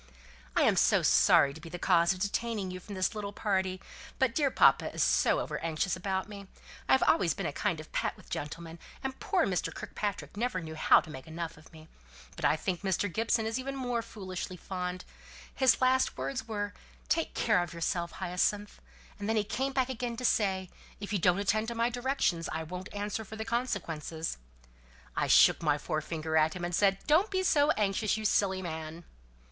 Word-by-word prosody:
"I - - +4
am - - +3
so - - +4
sorry 140 -1 +5
to 160 - -12
be 165 - -9
the 175 - -6
cause 170 -1 +3
of 190 - -2
detaining 205 -1 -1
you 185 - -6
from 200 +2 -9
this 185 +4 0
little 205 -2 -4
party, 190 -3 -1 0.4
but 265 -3 +2
dear 285 0 +2
papa - - +4
is - - 0
so - - +3
over - - -3
anxious 165 +3 -1
about 190 +1 -2
me. 200 -2 -9 0.4
I - - +6
have 265 - +5
always 175 -5 +3
been - - -4
a - - -2
kind 180 -2 -1
of 155 - -11
pet - - -1
with - - -17
gentlemen, 165 +3 -6 0.2
and 265 0 -4
poor 370 -4 +1
Mr. 185 -2 -1
Kirkpatrick 205 -2 -5
never 225 -3 -1
knew 160 -2 -7
how 155 - +5
to 160 - -11
make 130 0 -9
enough 165 +1 -5
of 155 +1 -17
me. 155 -1 -14 0.5
But - - -3
I - - +4
think 180 +2 -3
Mr. 190 -1 -1
Gibson 225 0 +1
is 225 +3 -1
even 275 +1 -4
more 245 -3 -1
foolishly 185 -4 -6
fond: 180 0 -5 0.5
his 265 -1 +4
last 260 0 +2
words 260 -3 -3
were, 205 -2 -3 0.3
'Take 330 - 0
care 215 -5 +3
of 175 -3 -4
yourself, 170 +1 -2
Hyacinth;' 190 +3 -1 0.4
and 205 +1 -3
then 225 - +2
he 215 - +2
came 265 +6 -2
back 260 -1 0
again 240 -2 -3
to 250 - -3
say, 190 -5 +1 0.3
'If 205 +1 -5
you 200 - +1
don't 180 +1 +3
attend 210 +2 +1
to 235 - -4
my 235 +1 +1
directions 245 -9 0
I 160 +1 -3
won't 180 +4 -7
answer 205 +2 -3
for 215 +1 -9
the 220 0 -5
consequences.' 165 - -3 0.8
I - - 0
shook - - +6
my 150 -3 +2
forefinger 155 +1 -3
at 155 +1 +3
him, 175 -1 -3
and 175 - -4
said, 195 +1 +3
'Don't 325 +8 +4
be 375 -1 0
so 295 -5 +3
anxious, 210 +1 +1
you 220 - -5
silly 190 -2 +2
man.'" 160 0 -6
195 Hz, 205 wpm, -30 LUFS, 170-225 Hz, 0.8 s, I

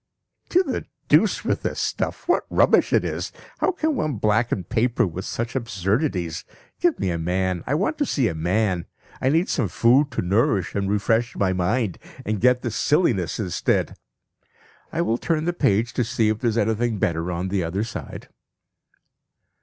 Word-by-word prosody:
(To 365 +2 +4
the - - -3 0.2
deuce - - +3
with - - 0
the - - -2
stuff! - - -3
What - - +2
rubbish - - +4
it - - +3
is! - - -3 0.3
How 380 - +2
can 315 -4 -1
one 155 - -1
blacken 110 -1 +1
paper 120 +4 +1
with 95 +2 -5
such 120 +2 -4
absurdities. 95 - -1 0.4
Give 350 -3 +2
me 90 - 0
a 85 - -2
man. 90 +1 -1
I 145 - +1
want 200 - -1
to 290 - +2
see 130 -5 +1
a - - -2
man! 90 +2 0 0.3
I 130 - +2
need 165 +6 +2
some 120 -7 0
food 125 - +3
to - - -1
nourish 95 -1 +1
and 100 -1 -1
refresh 115 +3 +1
my 95 -2 +1
mind, 95 +2 0 0.3
and 105 -1 -2
get 125 +1 +3
this 115 -3 -2
silliness 120 - +1
instead. 95 -6 0 1.0
I 165 +1 0
will 115 -7 0
turn 160 -2 0
the 175 - 0
page 115 - +1
to 125 - +1
see 110 -1 +1
if 110 0 -1
there 120 - +1
is 110 - -2
anything 110 +1 +1
better 85 -1 -1
on 90 +2 -3
the 95 -1 0
other 90 +5 -2
side.) 115 - -7
110 Hz, 180 wpm, -23 LUFS, 95-125 Hz, 1.0 s, To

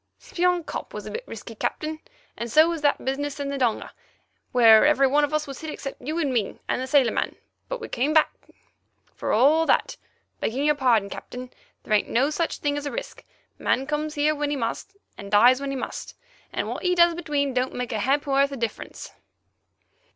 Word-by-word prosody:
"Spion 355 0 0
Kop - - -6
was - - -6
a - - -6
bit 460 - -5
risky, - - -8
Captain, 310 0 -3 0.4
and 235 -1 -5
so 310 +6 +6
was 335 -2 -2
that 290 -1 +1
business 280 +2 -2
in 280 -1 -3
the 280 - -3
donga, 240 -4 -1 0.6
where 225 -3 +7
every 295 -2 +4
one 290 +2 +3
was 300 -3 -3
hit 315 - -5
except 275 -2 -7
you 305 +6 -3
and 285 -6 0
me 220 -5 -1
and - - -1
the 260 - -3
sailor 265 -3 +4
man, - - -2 0.3
but - - -3
we - - -6
came 265 +5 0
back, 315 0 +4 0.8
for - - -3
all 305 +8 +4
that. - - +1 0.4
Begging 265 +6 -1
your 300 - +4
pardon, 245 -8 +2
Captain, 250 +4 -8 0.3
there 215 - -2
ain't 210 - +2
no 270 +6 +2
such 330 +2 -1
thing 290 0 -1
as 290 0 -4
risk. - - -7 0.4
Man 265 - +1
comes 300 +1 -2
here 300 +1 +2
when 295 -1 -2
he 290 - -1
must, 265 +10 -4 0.2
and 200 - -8
dies 240 +6 +5
when 280 - -3
he 275 - -3
must, - - -6 0.4
and - - -2
what - - -4
he 360 -1 +1
does 345 -1 +5
between 295 -5 -1
don't 255 +1 -1
make 250 -1 -3
a 220 - -1
ha'porth 275 +3 +2
of 275 - -5
difference." 230 -3 -5
280 Hz, 200 wpm, -25 LUFS, 250-305 Hz, 0.8 s, where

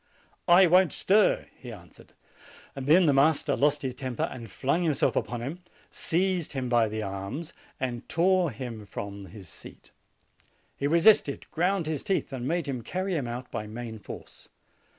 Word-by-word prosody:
"I 180 +2 +7
won't 180 -1 +4
stir," 205 +2 +3
he 125 - -10
answered. 90 -6 -15 0.6
Then 150 +7 +4
the 145 - +4
master 140 +3 +3
lost 145 0 +1
his 130 -1 -2
temper, 130 -2 -4
and 120 -3 -5
flung 140 +6 0
himself 155 -6 +1
upon 120 -1 -2
him, 150 +8 -5 0.3
seized 180 -1 0
him 130 -2 -3
by 120 -2 +3
the 110 0 -4
arms, 100 +11 -5 0.3
and 125 -2 -4
tore 180 +1 +3
him 115 -6 -7
from 100 -1 -7
his 95 0 -12
seat. - - -14 0.8
He 140 - -1
resisted, 165 -2 +4
ground 180 +1 0
his 155 -2 -2
teeth, 190 -7 -2
and 125 -1 -4
made 170 +1 0
him 130 -4 -4
carry 185 - -3
him 140 -6 -2
out 125 +2 -6
by 105 -3 -4
main 110 0 -7
force. - - -11
135 Hz, 165 wpm, -27 LUFS, 120-170 Hz, 0.8 s, I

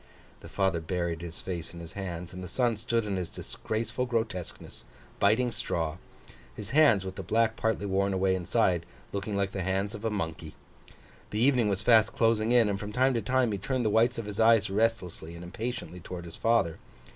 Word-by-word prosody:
The - - -12
father 95 -4 +1
buried 85 0 -2
his 85 -1 -7
face 85 -2 -5
in - - -8
his 85 -1 -8
hands, 90 -3 -5
and 90 0 -7
the - - -5
son 120 +3 +1
stood 115 +1 -1
in 100 -2 -2
his 90 -3 -3
disgraceful 115 +3 -3
grotesqueness, 110 -7 -3 0.3
biting 115 +5 +3
straw: 80 -6 -2 0.6
his 105 -1 -5
hands, 135 -10 +5
with 95 0 -6
the - - -3
black 110 +4 +1
partly 110 -3 0
worn 100 0 +1
away 95 0 +2
inside, 90 -1 +1 0.3
looking 100 +1 -2
like 100 -1 0
the 95 - -3
hands 95 +3 -1
of 105 0 -8
a 115 - +1
monkey. 80 -6 -4 0.7
The 105 - -2
evening 125 -3 +4
was 100 +1 -1
fast 110 -1 +5
closing 115 0 +2
in; 120 -3 +5
and 100 -1 -1
from 105 +1 -5
time 130 +3 +3
to 115 - 0
time, 125 +2 +2
he 100 - -2
turned 125 +4 -1
the 105 - +2
whites 115 +3 +3
of 115 - -4
his 105 0 -6
eyes 110 -3 +5
restlessly 95 -6 -1
and 85 - -9
impatiently 95 0 -5
towards 90 0 -7
his 85 - -8
father. 115 -8 +1
100 Hz, 205 wpm, -29 LUFS, 90-115 Hz, 0.7 s, hands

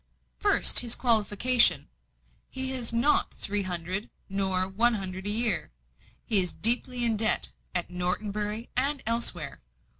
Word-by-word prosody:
"First, - - +7
his 240 -2 0
qualification. 225 - +1 0.6
He 265 0 -4
has 250 -3 -4
not 235 +6 0
three 205 0 -4
hundred, 185 +2 -5 0.2
nor 190 -1 -2
one 230 +5 0
hundred 190 -1 -6
a - - +2
year. 215 -3 +1 0.6
He 215 -4 +8
is 180 -2 +4
deeply 245 +1 +1
in 225 -2 0
debt, 215 0 +1 0.3
at 175 0 -3
Norton 180 +4 -3
Bury 210 +3 -6
and 275 +2 -2
elsewhere. 230 - -3
215 Hz, 140 wpm, -25 LUFS, 190-240 Hz, 0.6 s, He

